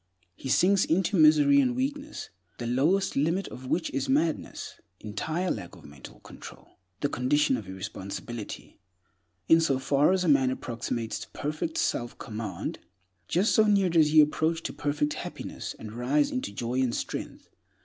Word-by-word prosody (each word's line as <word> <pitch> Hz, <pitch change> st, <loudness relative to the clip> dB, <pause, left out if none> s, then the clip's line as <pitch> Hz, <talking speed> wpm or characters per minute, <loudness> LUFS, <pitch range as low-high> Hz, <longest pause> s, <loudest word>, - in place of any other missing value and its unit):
He 135 Hz, -, -7 dB
sinks 190 Hz, +7 st, +4 dB
into 190 Hz, +4 st, +1 dB
misery 155 Hz, -, +6 dB
and 250 Hz, -2 st, +1 dB
weakness, 285 Hz, +3 st, -4 dB, 0.3 s
the 120 Hz, -, -5 dB
lowest 155 Hz, +11 st, +1 dB
limit 165 Hz, +7 st, +1 dB
of 130 Hz, 0 st, -9 dB
which 165 Hz, +4 st, -1 dB
is 135 Hz, 0 st, -2 dB
madness, 155 Hz, +4 st, -1 dB, 0.2 s
entire 155 Hz, -, -2 dB
lack 90 Hz, -5 st, -6 dB
of -, -, -16 dB
mental 70 Hz, -2 st, -13 dB
control, -, -, -13 dB, 0.2 s
the -, -, +2 dB
condition 140 Hz, +1 st, +2 dB
of 110 Hz, -6 st, -6 dB
irresponsibility. 100 Hz, +3 st, -7 dB, 0.7 s
In 165 Hz, 0 st, +6 dB
so 140 Hz, -5 st, +2 dB
far 140 Hz, +4 st, +3 dB
as 190 Hz, -1 st, +2 dB
a -, -, 0 dB
man 140 Hz, -4 st, +4 dB
approximates 115 Hz, -2 st, -3 dB
to -, -, -9 dB
perfect 155 Hz, +2 st, -3 dB
self 120 Hz, -1 st, -1 dB
command, 105 Hz, -5 st, -5 dB, 0.5 s
just 190 Hz, +6 st, +2 dB
so 220 Hz, -, +5 dB
near 200 Hz, -3 st, +3 dB
does 160 Hz, -3 st, +4 dB
he 155 Hz, 0 st, +7 dB
approach 160 Hz, +2 st, +1 dB
to -, -, -4 dB
perfect 150 Hz, 0 st, -1 dB
happiness, -, -, -6 dB
and 110 Hz, -, -8 dB
rise 130 Hz, +5 st, +1 dB
into 125 Hz, -5 st, -3 dB
joy 120 Hz, +5 st, -2 dB
and 125 Hz, -2 st, 0 dB
strength. -, -, -5 dB
145 Hz, 160 wpm, -28 LUFS, 120-170 Hz, 0.7 s, he